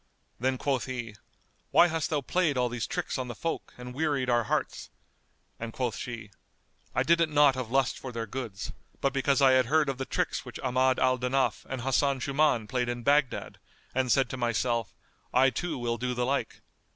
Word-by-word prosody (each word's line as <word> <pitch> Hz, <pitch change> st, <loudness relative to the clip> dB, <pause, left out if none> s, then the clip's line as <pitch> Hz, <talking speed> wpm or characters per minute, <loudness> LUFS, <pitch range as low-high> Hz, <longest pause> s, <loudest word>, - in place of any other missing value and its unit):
Then 130 Hz, +2 st, +1 dB
quoth 135 Hz, -1 st, 0 dB
he, 120 Hz, -5 st, -5 dB, 0.5 s
"Why -, -, +6 dB
hast 165 Hz, -1 st, -1 dB
thou 150 Hz, -3 st, 0 dB
played 160 Hz, 0 st, +1 dB
all 125 Hz, -1 st, +2 dB
these 120 Hz, -1 st, -3 dB
tricks -, -, -3 dB
on 130 Hz, -, -3 dB
the 120 Hz, -, -6 dB
folk 165 Hz, +8 st, -4 dB
and 125 Hz, 0 st, -8 dB
wearied 140 Hz, -3 st, 0 dB
our 120 Hz, -1 st, +2 dB
hearts?" -, -, -2 dB, 0.7 s
and 115 Hz, 0 st, -5 dB
quoth 125 Hz, -1 st, -2 dB
she, 115 Hz, -4 st, -6 dB, 0.6 s
"I -, -, +3 dB
did 170 Hz, +1 st, +4 dB
it 165 Hz, -, +3 dB
not 145 Hz, -2 st, +5 dB
of 130 Hz, -3 st, -4 dB
lust 135 Hz, 0 st, +1 dB
for 130 Hz, -, -6 dB
their 115 Hz, -1 st, -3 dB
goods, 115 Hz, -4 st, -5 dB, 0.3 s
but 135 Hz, -1 st, 0 dB
because 140 Hz, 0 st, +2 dB
I 135 Hz, -, +7 dB
had 130 Hz, -2 st, +4 dB
heard 150 Hz, +1 st, +3 dB
of 135 Hz, -1 st, -3 dB
the 135 Hz, -, -2 dB
tricks -, -, -1 dB
which -, -, -9 dB
Ahmad 130 Hz, 0 st, +2 dB
al 130 Hz, 0 st, +2 dB
Danaf 130 Hz, +2 st, 0 dB
and 130 Hz, -2 st, -3 dB
Hasan 135 Hz, +1 st, +1 dB
Shuman 140 Hz, -4 st, +2 dB
played 125 Hz, -1 st, -1 dB
in 120 Hz, 0 st, -3 dB
Baghdad 145 Hz, -1 st, +1 dB, 0.3 s
and 130 Hz, -1 st, +1 dB
said 135 Hz, 0 st, +4 dB
to 130 Hz, -, -4 dB
myself, 120 Hz, -2 st, 0 dB, 0.4 s
'I 130 Hz, +1 st, +5 dB
too 160 Hz, +5 st, -3 dB
will 120 Hz, -1 st, -2 dB
do 125 Hz, 0 st, -2 dB
the 125 Hz, 0 st, 0 dB
like. 140 Hz, +2 st, -2 dB
130 Hz, 200 wpm, -28 LUFS, 120-140 Hz, 0.7 s, I